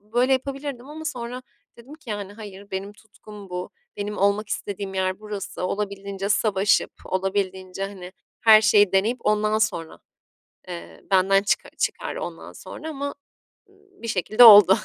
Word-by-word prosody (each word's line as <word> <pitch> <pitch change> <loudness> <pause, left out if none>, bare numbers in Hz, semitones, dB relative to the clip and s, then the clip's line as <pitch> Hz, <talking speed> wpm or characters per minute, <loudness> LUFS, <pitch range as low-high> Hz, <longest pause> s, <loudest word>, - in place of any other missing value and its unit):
böyle 240 +6 +1
yapabilirdim 270 -1 -3
ama 315 +1 -8
sonra 250 -3 -5 0.4
dedim 265 +6 -12
ki, 290 -8 -11
yani, 205 -1 -5
"Hayır, 205 -2 -11
benim 195 +2 -5
tutkum 210 -2 -14
bu, 180 0 -5 0.3
benim 205 0 -4
olmak 200 +2 +1
istediğim 200 -1 -4
yer 185 +1 -1
burası, 210 -3 -6
olabildiğince 200 -1 -4
savaşıp 205 -1 +2
olabildiğince, 190 0 -2
hani, 190 -2 -8 0.3
her 220 -1 +8
şeyi 205 -3 +5
deneyip 210 +6 +2
ondan 215 0 +2
sonra, 180 -7 -2 0.7
eee, 85 -1 -9
benden 195 +1 +4
çıka - - 0
çıkar - - -2
ondan - - -7
sonra." 320 - -9
ama 285 -1 -5 0.5
bir 395 -9 -14
şekilde 215 +6 +4
oldu. 205 -4 +10
205 Hz, 140 wpm, -24 LUFS, 195-235 Hz, 0.7 s, oldu